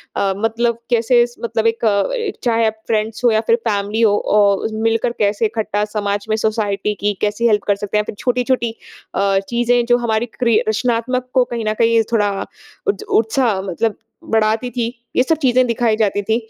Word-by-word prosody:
अ, 195 -1 +1
मतलब 230 +2 0
कैसे 240 0 +3
स 240 - -18
मतलब 230 -1 0
एक 230 0 0
अ, 395 - 0
चाहे 230 -2 +2
आप 220 0 -4
फ्रेंड्स 220 +2 -1
हो 240 - +5
या 220 0 +2
फिर 230 - +5
फैमिली 205 +1 -1
हो 210 -3 +4
औ 200 -1 +3
मिलकर 225 +1 +1
कैसे 210 +1 +1
इकट्ठा 210 -1 -1
समाज 205 -1 -2
में 215 - +2
सोसाइटी 210 -2 -1
की 205 +1 +1
कैसी 210 +3 +1
हेल्प 210 -2 +2
कर 205 - +3
सकते 205 +1 -3
हैं - - +3
या - - -8
फिर - - -18
छोटी 250 0 0
छोटी 245 -3 0 0.4
अ, 195 -1 +2
चीज़ें 240 0 +2
जो 240 0 +3
हमारी 230 -1 0
क्री 235 -3 +3
रचनात्मक 250 +3 -1
को 255 - +4
कहीं 230 -2 -3
न 215 - 0
कहीं 230 0 +4
थोड़ा 210 -3 +2 0.6
उत 405 +1 0
उत्साह 225 - +1
मतलब 205 +4 -2 0.3
बढ़ाती 220 +2 +1
थी। 240 -2 -1 0.3
ये 255 - +4
सब 320 +3 +1
चीज़ें 255 -2 +3
दिखाई 230 -1 +1
जाती 205 -2 +1
थी। 220 +3 +1
225 Hz, 195 wpm, -18 LUFS, 210-240 Hz, 0.6 s, हो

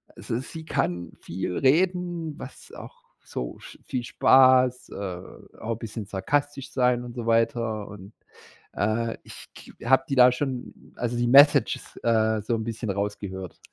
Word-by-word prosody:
also, 115 - -4
sie 160 +4 -9
kann 90 - -2
viel 90 0 -4
reden, 170 +1 +1
was - - -11
auch - - -11 0.2
so - - -6
sch - - -13
viel 125 -2 -3
Spaß, 130 0 +4
äh, 90 -3 -6 0.4
auch 115 - -4
'n 115 - -2
bisschen 110 -2 -6
sarkastisch 135 +8 -2
sein 125 -1 +2
und 120 0 -9
so 120 - -5
weiter. 115 -2 0
Und, 100 0 -11 0.6
äh, 110 +3 -1
ich - - -12
k - - -13
habe 130 +1 +4
die 135 - 0
da 125 0 +7
schon 130 -1 -4 0.2
also 120 0 -3
die 120 - +1
Messages, 140 0 +5
äh, 110 -1 +2
so 110 +3 -1
'n 110 - -3
bisschen 115 0 -5
rausgehört 100 -2 -4
115 Hz, 155 wpm, -25 LUFS, 105-130 Hz, 0.6 s, da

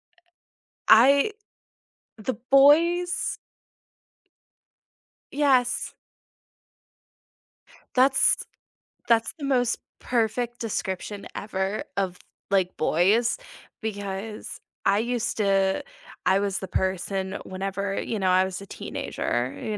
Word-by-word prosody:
Eh - - -29 0.7
I 275 - +6 0.8
the 225 +3 -3 0.2
boys. 335 +6 +4 1.9
Yes. 265 -4 +2 2.0
That's 265 +1 +4 0.7
that's 230 -1 +3
the 285 - -4
most 250 -3 +1 0.2
perfect 240 0 -1
description 200 -2 -4
ever 195 0 -2
of, 185 -2 -1 0.3
like, 185 -2 +1
boys, 200 - +2 0.4
because 205 0 -5 0.3
I 200 +1 +4
used 240 0 -1
to 195 -2 +2 0.4
I 190 - +4
was 200 -1 -1
the 190 - -6
person 190 +1 -2
whenever, 195 +1 -3
you 220 - -3
know, 190 -1 +1
I 185 +1 +5
was 190 0 -5
a - - -8
teenager 125 -7 -3
you 215 -1 -3
210 Hz, 95 wpm, -25 LUFS, 190-245 Hz, 2.0 s, I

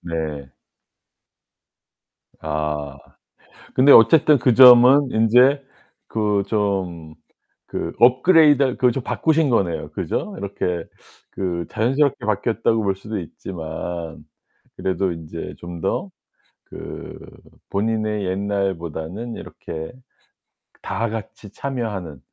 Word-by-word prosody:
네. 80 -5 -5 1.9
아. 75 -2 -3 0.8
근데 135 +2 +6
어쨌든 150 +6 +7
그 125 -1 +3
점은 130 +2 +8
인제 125 +6 +4 0.5
그 105 -2 0
좀 95 -7 -2 0.5
그 - - -5
업그레이드 140 +1 +5
그 125 -1 +3
좀 135 - -3
바꾸신 160 -2 +1
거네요 95 -8 0
그죠? - - -3
이렇게 90 -3 -4 0.4
그 85 -3 -3
자연스럽게 135 +4 0
바뀌었다고 110 +1 0
볼 95 -1 0
수도 105 +1 -6
있지만 80 -1 -7 0.5
그래도 95 0 -1
인제 80 0 -8
좀 85 -1 -9
더 95 - -2 0.6
그 - - -9 0.5
본인의 105 -1 -1
옛날보다는 95 +1 -3
이렇게 80 -1 -8 0.9
다 115 -1 -3
같이 105 -2 -8
참여하는 105 - -5
100 Hz, 205 characters per minute, -21 LUFS, 85-125 Hz, 1.9 s, 점은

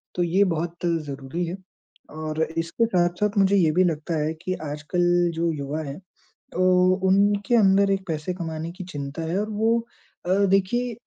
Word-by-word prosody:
तो 175 - +1
ये 185 +4 +3
बहुत 170 +2 -4
ज़रूरी 155 0 -2
है। 175 +3 -5 0.5
और 155 0 -4 0.2
इसके 170 +8 0
साथ-साथ 185 +1 0
मुझे 195 0 +4
ये 165 -5 +4
भी 185 +4 +3
लगता 165 -1 -1
है 155 +2 -1
कि 185 - -2
आजकल 150 +4 -3 0.3
जो 165 0 0
युवा 145 +2 -4
हैं, 140 +3 -7 0.5
तो 185 0 +4
उनके 200 +3 +3
अंदर 195 -1 +4
एक 195 0 -1
पैसे 160 +2 -2
कमाने 165 -2 -5
की 185 0 -8
चिंता 145 -2 -6
है 165 +4 -1
और 215 - -3
वो 225 +2 +2 0.5
अ, - - -1 0.2
देखिए 215 +6 +1
175 Hz, 170 wpm, -24 LUFS, 160-195 Hz, 0.5 s, मुझे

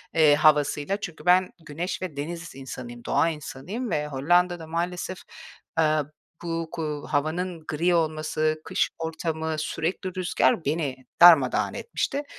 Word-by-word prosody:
eee, 155 -3 +6
havasıyla. 150 +4 +3
Çünkü 170 -2 -7
ben, 180 +1 +5 0.2
güneş 170 +6 -4
ve 165 -6 -5
deniz 165 0 -5
insanıyım, 120 -3 -8
doğa 165 - +2
insanıyım 170 - -5
ve 150 -1 0
Hollanda 175 +6 +2
da 160 - -9
maalesef, 175 +2 -3 0.6
eee, 160 - +5 0.6
bu 165 -1 -3
ku 150 -3 -4
havanın 160 +3 -1
gri 170 +3 +1
olması, 155 -1 0
kış - - +1
ortamı, 160 -1 -2
sürekli 180 +4 -3
rüzgâr 175 -2 +1
beni 145 -3 -1 0.2
darmadağın 160 -8 +7
etmişti. 290 -10 -2
160 Hz, 130 wpm, -26 LUFS, 150-175 Hz, 0.6 s, darmadağın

